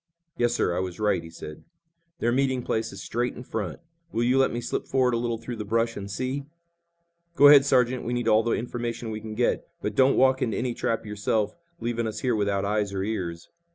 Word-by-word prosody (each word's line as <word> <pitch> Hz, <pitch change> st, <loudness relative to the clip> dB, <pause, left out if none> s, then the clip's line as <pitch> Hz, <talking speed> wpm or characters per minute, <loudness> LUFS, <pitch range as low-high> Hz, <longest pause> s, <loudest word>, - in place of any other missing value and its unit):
"Yes, 120 Hz, -4 st, +1 dB
sir, 85 Hz, -, +1 dB
I -, -, 0 dB
was 90 Hz, 0 st, -4 dB
right," 105 Hz, -4 st, +2 dB
he 80 Hz, -, -10 dB
said. 75 Hz, -2 st, -9 dB, 0.5 s
"Their 120 Hz, -, +1 dB
meeting 130 Hz, 0 st, +1 dB
place 110 Hz, -1 st, -1 dB
is 95 Hz, -2 st, -8 dB
straight 120 Hz, +5 st, -2 dB
in 125 Hz, -, -8 dB
front. 105 Hz, -9 st, -4 dB, 0.3 s
Will 115 Hz, -, 0 dB
you 125 Hz, +2 st, +3 dB
let 135 Hz, -, +3 dB
me 120 Hz, -, -2 dB
slip 120 Hz, -, -3 dB
forward 130 Hz, -2 st, +2 dB
a -, -, +2 dB
little 115 Hz, -1 st, -1 dB
through 115 Hz, +1 st, -6 dB
the 105 Hz, -, -3 dB
brush 115 Hz, +2 st, 0 dB
and 100 Hz, 0 st, -6 dB
see?" 130 Hz, +6 st, -3 dB, 0.9 s
"Go 145 Hz, -3 st, +8 dB
ahead, 140 Hz, -2 st, +8 dB
Sergeant. 125 Hz, -2 st, +2 dB
We 120 Hz, -, -2 dB
need 120 Hz, -1 st, -1 dB
all 110 Hz, 0 st, +5 dB
the 115 Hz, 0 st, 0 dB
information 120 Hz, -1 st, -3 dB
we 110 Hz, 0 st, -5 dB
can 110 Hz, 0 st, -7 dB
get, 120 Hz, +2 st, 0 dB
but 105 Hz, -, -3 dB
don't 130 Hz, +4 st, +4 dB
walk 130 Hz, 0 st, +4 dB
into 115 Hz, -4 st, 0 dB
any 125 Hz, -1 st, -1 dB
trap 115 Hz, -1 st, -2 dB
yourself, 105 Hz, 0 st, -1 dB, 0.2 s
leaving 115 Hz, -1 st, -1 dB
us 110 Hz, -, -5 dB
here 125 Hz, -3 st, +1 dB
without 100 Hz, -2 st, 0 dB
eyes 105 Hz, -1 st, 0 dB
or 95 Hz, -, -1 dB
ears." 90 Hz, -6 st, -4 dB
115 Hz, 225 wpm, -26 LUFS, 105-125 Hz, 0.9 s, Go